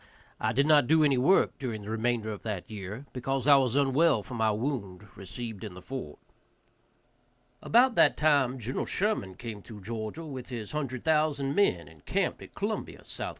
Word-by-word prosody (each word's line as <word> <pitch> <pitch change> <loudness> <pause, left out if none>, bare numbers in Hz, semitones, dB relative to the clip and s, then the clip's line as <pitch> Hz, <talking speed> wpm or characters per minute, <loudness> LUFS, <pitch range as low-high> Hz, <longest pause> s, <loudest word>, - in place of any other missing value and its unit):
I 110 - 0
did 135 +5 +2
not 150 -4 +5
do 160 0 +5
any 140 -4 +3
work 140 0 +3
during 115 -6 -4
the 105 - -6
remainder 115 -1 -1
of 105 - -7
that 105 -5 -4
year, 105 +5 -7
because 135 +1 -2
I 145 -1 +7
was 130 -2 +1
unwell 140 -2 +3
from 120 - -7
my 110 -1 +2
wound 105 -4 -3
received 110 +3 -7
in 105 -5 -7
the 90 - -10
fort. 115 - -6 1.4
About 245 +2 +4
that - - +4
time 140 -4 +3
Gen. 125 +2 -3
Sherman 185 - -1
came 110 -2 -7
through 105 0 -11
Georgia 110 - -5
with 130 -5 -7
his 115 -5 -6
hundred 135 -5 -3
thousand 150 -3 +1
men, 90 - +2
and 80 -2 -17
camped - - -1
at - - -12
Columbia, - - -3
S.C. - - -6
125 Hz, 185 wpm, -29 LUFS, 110-145 Hz, 1.4 s, I